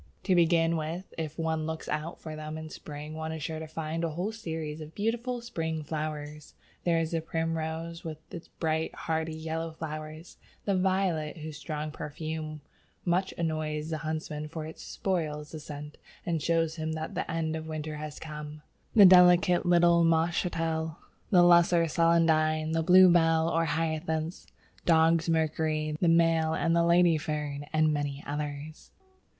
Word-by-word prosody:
To 190 Hz, -, +2 dB
begin 170 Hz, -1 st, +3 dB
with, 165 Hz, +4 st, -5 dB
if 160 Hz, -2 st, -5 dB
one 160 Hz, -1 st, -1 dB
looks 160 Hz, 0 st, -5 dB
out 155 Hz, +3 st, -3 dB
for 155 Hz, -1 st, -7 dB
them 155 Hz, 0 st, -6 dB
in 160 Hz, 0 st, -8 dB
spring 150 Hz, +1 st, -8 dB
one 160 Hz, 0 st, -4 dB
is 160 Hz, -2 st, -5 dB
sure 160 Hz, +1 st, -3 dB
to 160 Hz, -, -6 dB
find 160 Hz, +1 st, -4 dB
a 165 Hz, -, 0 dB
whole 175 Hz, +7 st, -3 dB
series 160 Hz, -7 st, -5 dB
of 155 Hz, +1 st, -10 dB
beautiful 235 Hz, +3 st, -1 dB
spring 160 Hz, -9 st, -3 dB
flowers. 150 Hz, -1 st, -5 dB, 0.3 s
There 170 Hz, -1 st, +3 dB
is 165 Hz, -1 st, -1 dB
the 165 Hz, -1 st, 0 dB
Primrose, 165 Hz, +1 st, -3 dB
with 160 Hz, -2 st, -5 dB, 0.2 s
its 170 Hz, -, -8 dB
bright, 160 Hz, -1 st, -2 dB
hardy, 160 Hz, 0 st, -2 dB
yellow 160 Hz, +1 st, -4 dB
flowers; 155 Hz, +1 st, -7 dB, 0.3 s
the 200 Hz, -, +1 dB
Violet, 185 Hz, -4 st, 0 dB
whose 155 Hz, -1 st, -7 dB
strong 155 Hz, 0 st, -4 dB
perfume 155 Hz, 0 st, -5 dB, 0.4 s
much 185 Hz, +2 st, +1 dB
annoys 155 Hz, -1 st, -2 dB
the 160 Hz, -, -2 dB
huntsman, 155 Hz, -1 st, -4 dB
for 155 Hz, 0 st, -6 dB
it 160 Hz, -, -9 dB
spoils 155 Hz, -5 st, -3 dB
the 155 Hz, -, -6 dB
"scent" 150 Hz, 0 st, -9 dB, 0.3 s
and 165 Hz, -3 st, -1 dB
shows 165 Hz, 0 st, +1 dB
him 160 Hz, 0 st, -2 dB
that 160 Hz, 0 st, -4 dB
the -, -, -3 dB
end 160 Hz, -1 st, -1 dB
of 160 Hz, 0 st, -5 dB
winter 155 Hz, -1 st, -4 dB
has 150 Hz, 0 st, -6 dB
come; 150 Hz, -1 st, -8 dB, 0.3 s
the 205 Hz, -3 st, +9 dB
delicate 180 Hz, -1 st, +6 dB
little 170 Hz, -1 st, +5 dB
Moschatel, 165 Hz, -1 st, 0 dB, 0.3 s
the 180 Hz, -3 st, +6 dB
Lesser 175 Hz, -1 st, +5 dB
Celandine, 160 Hz, -1 st, +3 dB
the 165 Hz, 0 st, +1 dB
Bluebell 170 Hz, -2 st, +6 dB
or 165 Hz, 0 st, +1 dB
Hyacinth, 160 Hz, +1 st, -2 dB, 0.4 s
Dog's 165 Hz, 0 st, +4 dB
Mercury, 155 Hz, -1 st, 0 dB
the 175 Hz, -, +3 dB
Male 165 Hz, -1 st, +3 dB
and 165 Hz, 0 st, +1 dB
the 170 Hz, -, +4 dB
Lady 170 Hz, -1 st, +4 dB
Fern, 145 Hz, -1 st, -4 dB
and 155 Hz, -1 st, +3 dB
many 145 Hz, -1 st, -3 dB
others. 150 Hz, +1 st, -5 dB
160 Hz, 160 wpm, -29 LUFS, 155-170 Hz, 0.4 s, the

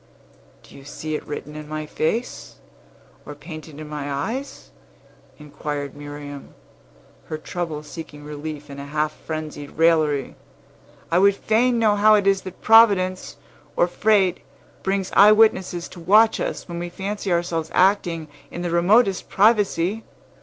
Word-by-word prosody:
"Do -, -, -17 dB
you 140 Hz, -, -13 dB
see 155 Hz, +2 st, -6 dB
it 150 Hz, -, -3 dB
written 150 Hz, 0 st, -7 dB
in 150 Hz, 0 st, -9 dB
my 155 Hz, 0 st, -4 dB
face, 215 Hz, +11 st, -3 dB, 0.7 s
or 145 Hz, -, -9 dB
painted 155 Hz, 0 st, -10 dB
in 155 Hz, -, -8 dB
my 145 Hz, -1 st, -5 dB
eyes?" 230 Hz, -, -5 dB, 0.7 s
inquired 145 Hz, -1 st, -6 dB
Miriam, 145 Hz, -1 st, -9 dB, 0.7 s
her 155 Hz, -, -5 dB
trouble 155 Hz, -1 st, -5 dB
seeking 150 Hz, -1 st, -10 dB
relief 150 Hz, 0 st, -7 dB
in 140 Hz, -, -8 dB
a 140 Hz, -, -8 dB
half 150 Hz, +1 st, -1 dB
frenzied 155 Hz, -2 st, -7 dB
raillery. 155 Hz, -4 st, +2 dB, 0.8 s
"I 170 Hz, -, +4 dB
would 200 Hz, +1 st, +5 dB
fain 235 Hz, +4 st, +1 dB
know 220 Hz, -3 st, +3 dB
how 215 Hz, +1 st, +5 dB
it 205 Hz, -2 st, +1 dB
is 195 Hz, -1 st, +3 dB
that 185 Hz, -1 st, -10 dB
Providence, 200 Hz, -5 st, +4 dB, 0.4 s
or -, -, +4 dB
fate, 195 Hz, 0 st, +2 dB, 0.4 s
brings 195 Hz, -1 st, -2 dB
eye 210 Hz, +2 st, +8 dB
witnesses 190 Hz, -5 st, +2 dB
to 180 Hz, -, -12 dB
watch 215 Hz, +6 st, +4 dB
us, -, -, -4 dB
when 170 Hz, -1 st, -6 dB
we 175 Hz, 0 st, -4 dB
fancy 200 Hz, +1 st, -4 dB
ourselves 170 Hz, -2 st, -1 dB
acting 180 Hz, -4 st, +2 dB, 0.2 s
in 175 Hz, -, -6 dB
the 175 Hz, -, -2 dB
remotest 195 Hz, +3 st, +3 dB
privacy. 205 Hz, -1 st, +2 dB
170 Hz, 145 wpm, -22 LUFS, 150-200 Hz, 0.8 s, eye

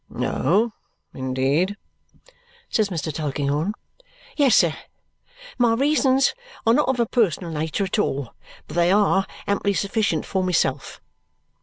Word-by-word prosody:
"Oh, 205 Hz, -, +1 dB, 0.4 s
indeed?" 135 Hz, +9 st, 0 dB, 0.9 s
says 215 Hz, -2 st, +1 dB
Mr. 160 Hz, -4 st, -3 dB
Tulkinghorn. 145 Hz, +4 st, -1 dB, 0.6 s
"Yes, 280 Hz, -6 st, +4 dB
sir. 170 Hz, -4 st, +4 dB, 0.9 s
My 235 Hz, -2 st, +4 dB
reasons 275 Hz, 0 st, +3 dB, 0.3 s
are 225 Hz, -, +5 dB
not 295 Hz, +1 st, +2 dB
of 260 Hz, -2 st, 0 dB
a 235 Hz, -, +3 dB
personal 190 Hz, -, 0 dB
nature 160 Hz, +5 st, -2 dB
at 195 Hz, +3 st, -1 dB
all, 140 Hz, -, -2 dB, 0.3 s
but -, -, -9 dB
they 175 Hz, +1 st, +3 dB
are 195 Hz, -1 st, +3 dB, 0.2 s
amply 200 Hz, 0 st, 0 dB
sufficient 200 Hz, -5 st, 0 dB
for 190 Hz, -1 st, -1 dB
myself." 145 Hz, -7 st, -1 dB
190 Hz, 125 wpm, -23 LUFS, 155-225 Hz, 0.9 s, are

